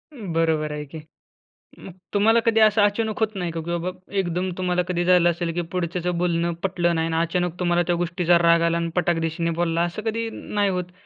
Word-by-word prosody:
बरोबर 165 - -1
आहे 150 0 -5
की. 155 +3 -9 0.8
मग 190 - -10 0.2
तुम्हाला 225 +3 +4
कधी 225 -1 +3
असं 215 0 +5
अचानक 210 +1 0
होत 220 -1 0
नाही 175 -2 -2
का? 165 - -4
की 165 +2 -6
बाबा 170 +2 -3 0.3
एकदम 180 0 -1
तुम्हाला 180 -1 +1
कधी 175 -1 0
झालं 180 -1 +5
असेल 170 0 -3
की 175 - -1
पुढच्याचं 180 0 -2
बोलणं 170 -1 0
पटलं 175 -3 0
नाही 165 0 0
आणि - - 0
अचानक 175 +1 -2
तुम्हाला 175 -1 +2
त्या 175 - +1
गोष्टीचा 175 0 +2
राग 170 0 +4
आला 170 0 +2
आणि 170 0 -1
पटाक-धिशीने 165 -1 0
बोलला 170 -1 +1
असं 175 +5 -3
कधी 225 +1 -2
नाही 205 -1 -1
होतं? 180 -1 -4
175 Hz, 200 wpm, -23 LUFS, 170-185 Hz, 0.8 s, असं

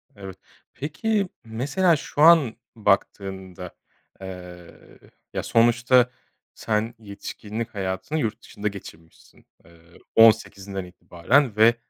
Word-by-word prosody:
Evet. 95 -2 -10 0.4
Peki, 195 - -1 0.2
mesela, 145 +11 +1
şu 145 - -4
an 155 -8 +6 0.2
baktığında, 95 -3 -2 0.5
eee, 90 -2 -11 0.3
ya - - -3
sonuçta 120 +2 +4 0.4
sen 110 +1 -2
yetişkinlik 105 +2 -7
hayatını 95 +10 -3
yurt 115 -6 -2
dışında 105 +1 -6
geçirmişsin, 85 -5 -11 0.2
eee, 85 - -19 0.4
18’inden 100 -4 +3
itibaren 95 - 0
ve 110 +2 +5
110 Hz, 95 wpm, -24 LUFS, 95-120 Hz, 0.5 s, an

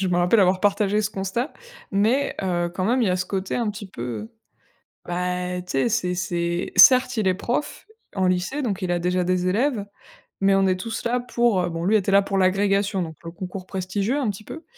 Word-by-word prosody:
Je 190 - 0
me 175 - +1
rappelle 180 +5 +4
avoir 185 0 +3
partagé 205 +1 +2
ce 210 - -1
constat 195 +8 -3 0.4
mais 225 +8 +1
heu, 175 -2 -1
quand 185 - -2
même 250 +2 +2
il 205 - +2
y - - +2
a 180 - +1
ce 185 - -3
côté 190 -1 -3
un 235 -3 0
petit 205 -1 -8
peu, 120 -10 -9
heu 110 -3 -5 0.8
bah 180 0 -2
et 180 - -5
tu 180 - -8
sais 135 - +2
c'est 180 -5 0
c'est 175 -1 -2
certes 250 -2 +7
il 205 -3 +1
est 185 - +2
prof 245 +8 -3 0.3
en 190 - +1
lycée 185 +11 0
donc 200 -6 -2
il 180 -1 -1
a 175 - +1
déjà 180 +1 0
des 180 0 0
élèves, 220 +1 0 0.6
mais 195 0 +4
on 195 0 +3
est 185 -1 +2
tous 225 +3 -5
là 245 +1 +1
pour, 240 -5 +1
heu 175 - -2
bon 165 +1 -4
lui 215 +2 +4
était 195 -1 0
là 200 - +7
pour 195 0 -3
l'agrégation 195 +1 +2
donc 160 -1 -6
le 165 - -6
concours 185 +1 -7
prestigieux 195 +7 -2
un 260 - 0
petit 205 +1 -5
peu, 320 - -9
195 Hz, 235 wpm, -23 LUFS, 180-215 Hz, 0.8 s, certes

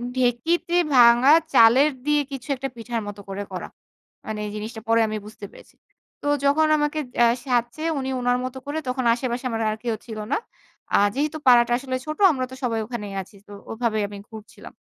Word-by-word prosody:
ঢেঁকিতে 255 +8 0 0.2
ভাঙা 240 +3 +7 0.2
চালের 260 +7 +6
দিয়ে 295 0 +3
কিছু 270 +1 -7
একটা 270 +1 -4
পিঠার 230 0 -4
মত 205 0 -7
করে 195 +1 -4
করা। 180 - -5 0.6
মানে 215 -1 -4
জিনিসটা 220 +1 -6
পরে 230 0 +3
আমি 215 0 -3
বুঝতে 210 -1 -10
পেরেছি। - - -17 0.5
তো 290 - -4 0.2
যখন 310 +3 +3
আমাকে 295 +1 -1 0.2
আ - - +7 0.2
সাধছে 245 +3 -1 0.2
উনি 265 0 -3
ওনার 245 0 +1
মত 255 +1 -6
করে 290 +2 -3
তখন 255 0 -2
আশেপাশে 245 +1 -3
আমার 225 -1 -3
আর 215 - -4
কেউ 230 -2 -1
ছিল 220 -3 -8
না। - - +2 0.6
আ - - +6 0.2
যেহেতু 300 +3 -1
পাড়াটা 240 -1 +6
আসলে 260 -1 -4
ছোট 305 0 -5
আমরা 255 -3 -2
তো 260 - -8
সবাই 230 -2 0
ওখানেই 210 -4 -6
আছি। 190 +2 -15
তো - - -14 0.2
ওভাবেই 225 -2 -1
আমি 205 0 -9
ঘুরছিলাম। 220 -1 -12
240 Hz, 185 wpm, -23 LUFS, 225-270 Hz, 0.6 s, ভাঙা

